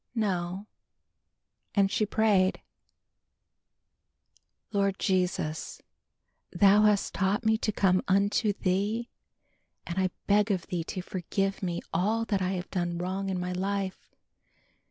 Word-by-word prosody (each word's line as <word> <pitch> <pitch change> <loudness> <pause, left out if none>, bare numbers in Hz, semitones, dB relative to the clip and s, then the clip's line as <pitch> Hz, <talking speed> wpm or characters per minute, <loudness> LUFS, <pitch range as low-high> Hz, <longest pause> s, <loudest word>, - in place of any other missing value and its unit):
No, 190 -3 -1 1.1
and 200 -1 +3
she 215 -3 +1
prayed; 200 -4 +2 2.1
"Lord 200 -2 +1
Jesus, 180 -5 -1 0.7
Thou 200 +3 +5
hast 210 -2 +2
taught 195 +4 0
me 220 0 +4
to 215 - 0
come 185 -3 +2
unto 200 +3 +2
Thee 205 +5 -1 0.8
and 175 +2 -3
I 185 0 +2 0.2
beg 210 +1 +3
of 190 -4 0
Thee 175 -3 -3
to 185 - -5
forgive 195 +2 -2
me 175 -3 -2
all 215 +6 +1
that 200 -4 0
I 185 +1 0
have 180 0 -5
done 175 -2 -1
wrong 190 +2 -3
in 185 -1 -1
my 180 0 -3
life. 195 +1 -3
195 Hz, 125 wpm, -28 LUFS, 185-205 Hz, 2.1 s, Thou